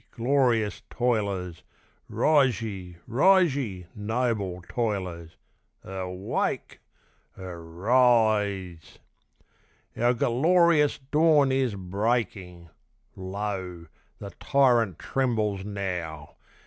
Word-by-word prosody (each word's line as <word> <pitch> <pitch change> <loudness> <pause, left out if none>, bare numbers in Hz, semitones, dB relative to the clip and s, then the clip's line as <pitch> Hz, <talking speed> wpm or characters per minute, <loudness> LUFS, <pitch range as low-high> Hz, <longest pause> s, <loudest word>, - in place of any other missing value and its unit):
glorious 120 -4 +1
toilers! 100 -8 -1 0.5
Rise 135 -8 +3
ye! 95 -6 -7
rise 175 +5 +4
ye! 100 -10 -4
noble 105 -4 -2
toilers! 95 -8 -3 0.5
Erwake! 95 0 -3 0.6
er 90 -3 -8
rise! 100 -2 +1 1.0
Our 120 +2 +2
gerlorious 155 +5 +3
dawn 150 -3 +4
is 130 -5 0
breaking! 95 -3 -3 0.4
Lo! 95 -2 -5 0.3
the 100 -1 -8
tyrant 120 - +2
trembles 110 -7 -1
now! 90 -7 -5
105 Hz, 75 wpm, -26 LUFS, 95-125 Hz, 1.0 s, rise